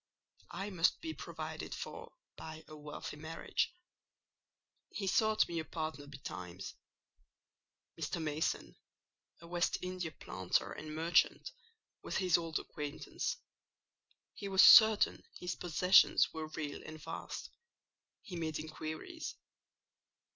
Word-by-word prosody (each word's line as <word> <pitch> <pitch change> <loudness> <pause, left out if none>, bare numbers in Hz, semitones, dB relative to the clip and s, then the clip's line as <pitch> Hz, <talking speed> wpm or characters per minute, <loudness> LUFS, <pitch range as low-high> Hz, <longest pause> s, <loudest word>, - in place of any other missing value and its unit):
I 200 +1 -4
must 175 -2 +3
be 320 -1 -4
provided - - -6
for - - -7 0.2
by 160 0 -8
a 155 - -10
wealthy 150 0 -7
marriage. 160 +2 -2 1.2
He 210 - -4
sought 215 +1 +3
me 170 -1 -2
a - - -2
partner 155 -3 -4
betimes. 90 -10 -7 1.3
Mr. 175 - -2
Mason, 155 0 -2 0.6
a 170 - -11
West 175 0 +1
India 180 -2 -3
planter 95 - -1
and 155 0 -6
merchant, 165 +2 +2 0.5
was - - -3
his 185 -3 +3
old 165 -2 0
acquaintance. 145 0 -4 1.0
He 200 - -6
was 190 -1 +6
certain 220 -2 +8 0.2
his 180 0 -3
possessions 180 +2 +5
were 160 -1 -4
real 155 -2 -5
and 155 0 -9
vast: - - -6 0.7
he 180 - -7
made 160 -2 -2
inquiries. 155 - -6
160 Hz, 115 wpm, -35 LUFS, 155-180 Hz, 1.3 s, certain